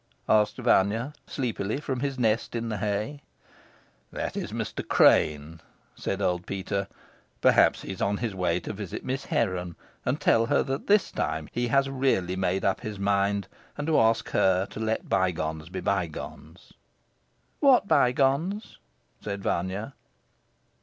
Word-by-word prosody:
asked 105 -1 +3
Vanya 115 +2 +2
sleepily 120 -2 -2
from 135 -4 -3
his 135 0 -2
nest 115 -1 0
in 115 0 -2
the 110 - -2
hay. 105 +8 -2 0.9
"That - - -4
is - - -4
Mr. - - -4
Crane," 75 +1 +3 0.3
said 100 +1 -3
old 90 -1 0
Peter. 100 0 -2 0.5
"Perhaps - - +4
he - - -5
is 95 - -7
on 100 +1 +1
his 115 -2 -3
way 90 -1 0
to - - -5
visit 100 -3 -6
Miss 130 +1 -3
Heron 90 -6 -1 0.3
and - - -1
tell 115 0 +3
her - - +3
that 135 0 -4
this 205 -1 +3
time 80 -1 -2
he 120 0 -1
has 135 +3 +3
really 130 -10 0
made 95 0 0
up 95 - +1
his 110 -4 -5
mind, 100 0 +1 0.3
and 145 - -3
to 160 -1 +3
ask 115 0 +2
her 95 0 +3
to - - -7
let 110 0 -1
bygones 80 -4 -1
be 90 +1 -5
bygones." 90 -6 -4 0.9
"What 265 -7 +5
bygones?" 140 - +1 0.4
said 100 -1 -5
Vanya. 95 +9 -2
105 Hz, 150 wpm, -27 LUFS, 95-125 Hz, 0.9 s, What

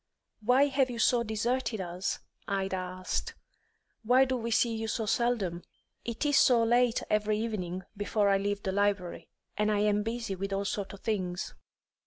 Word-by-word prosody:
"Why 250 +5 +5
have 270 -2 +1
you 240 - -5
so 235 +1 +3
deserted 225 +1 -1
us?" 180 +1 -3 0.3
Ida 195 -1 -1
asked. 185 0 -3 0.7
"Why 250 +4 +5
do 260 0 -1
we 235 -2 -3
see 230 0 +2
you 225 0 -3
so 220 0 -1
seldom?" 210 -6 0 0.4
"It 235 +4 -3
is 290 -1 +3
so 240 -3 +5
late 240 0 +3
every 210 0 +1
evening 190 -5 -3
before 205 +1 +1
I 195 0 +3
leave 205 0 -2
the 190 - -1
library, 200 -2 0 0.3
and 210 0 +2
I 205 -1 +2
am 210 0 +2
busy 225 -1 -3
with 195 +1 -4
all 200 +1 -1
sorts 200 0 -3
of 195 - -17
things." 185 -5 -2
210 Hz, 175 wpm, -30 LUFS, 195-235 Hz, 0.7 s, Why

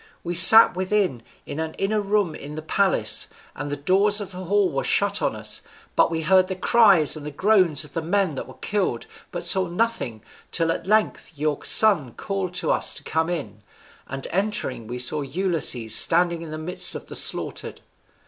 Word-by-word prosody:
We 175 - -5
sat 190 +6 +9
within, 185 - -2 0.2
in 150 - -8
an 160 0 -5
inner 210 +2 -2
room 200 -4 -1
in 145 +1 -10
the 155 - -8
palace, 195 +4 +1 0.3
and 145 +1 -7
the - - -3
doors 195 +7 +1
of 200 -2 -8
the 180 - -11
hall 200 0 0
were 135 - -3
shut - - 0
on - - -2
us, - - -2 0.3
but - - +2
we 165 -1 -4
heard 185 +2 +2
the 190 - -5
cries 195 -7 +3
and 155 - -9
the 150 - -7
groans 185 -2 +1
of 145 -2 -13
the 165 - -4
men 185 0 -1
that 135 - -8
were - - -14
killed, 195 - -4 0.3
but 175 -1 -6
saw 185 +1 +2
nothing, 175 - -4 0.3
till 165 -1 -1
at 165 - -6
length 215 -4 -1
your 150 0 -3
son 170 - +1
called 190 -3 -5
to - - -1
us - - +2
to - - -9
come 160 +1 -2
in, 155 -10 -7 0.5
and 135 0 -7
entering 185 - -3
we 120 +2 -7
saw 125 +5 +1
Ulysses 140 - 0
standing 170 +3 +4
in 165 - -9
the 155 - -7
midst 170 +4 +4
of - - -8
the - - -11
slaughtered." - - -6
175 Hz, 195 wpm, -22 LUFS, 150-195 Hz, 0.5 s, sat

